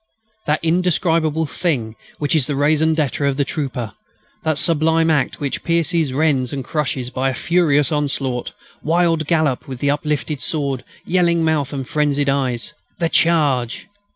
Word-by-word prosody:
That 150 +1 +1
indescribable 165 -2 +1
thing 135 -9 -2 0.2
which 145 +2 0
is 145 -5 +3
the 145 - -1
raison 155 +3 +2
d'être 150 -2 -1
of 135 - -2
the 140 - +1
trooper, 125 -8 -4 0.5
that 155 -2 0
sublime 160 0 +3
act 145 -4 0
which 140 -2 -3
pierces, 165 -3 +1
rends, 135 -3 +1
and 135 -2 -4
crushes 135 -5 -2
by 135 0 0
a 130 - -3
furious 150 -4 +2
onslaught 135 -4 -1 0.3
wild 165 -1 +1
gallop, 155 -6 +1
with 130 -1 -7
uplifted 145 0 -1
sword, 140 -5 -2 0.2
yelling 170 -2 +2
mouth, 155 -4 0
and 135 -3 -4
frenzied 145 -2 +1
eyes. 130 -1 -1 0.2
The 165 -2 0
charge! 145 -9 +2
150 Hz, 150 wpm, -19 LUFS, 135-160 Hz, 0.5 s, is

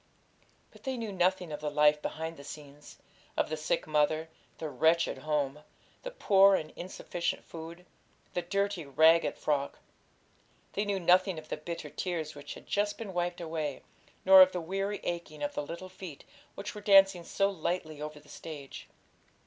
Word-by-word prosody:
But - - -18
they 265 -1 -3
knew 225 -3 -4
nothing 180 -2 +1
of 150 - -4
the 150 0 -2
life 150 0 +4
behind 160 +1 -4
the 140 - -11
scenes; 145 0 -11 0.4
of - - +1
the - - 0
sick 155 0 -1
mother, 155 +1 +1 0.3
the 160 - -4
wretched 160 +1 +2
home, 150 -1 -1 0.4
the - - -5
poor 195 - +5
and 155 -4 -4
insufficient 175 -1 -4
food, 165 +2 -9 0.5
the 175 - 0
dirty, 200 0 -1
ragged 160 +4 +4
frock. 140 -2 -1 1.0
They 205 - 0
knew 200 -1 -1
nothing 185 +1 +4
of 155 0 -9
the - - -1
bitter 170 +2 -6
tears 165 -4 -3
which 145 0 -8
had - - -13
just 205 0 0
been 205 -4 -6
wiped 175 0 -2
away, 160 -4 -3 0.4
nor 190 0 +10
of 185 0 +7
the 180 - -1
weary 195 +4 -3
aching 170 -4 -4
of 145 - -2
the - - -2
little 170 +5 -7
feet 185 -5 -10 0.3
which 205 +1 -6
were 210 - -8
dancing 195 -3 +6
so 195 +3 +1
lightly 160 -4 -3
over 150 0 -6
the 150 - -21
stage. 145 -4 -9
170 Hz, 175 wpm, -30 LUFS, 150-190 Hz, 1.0 s, nor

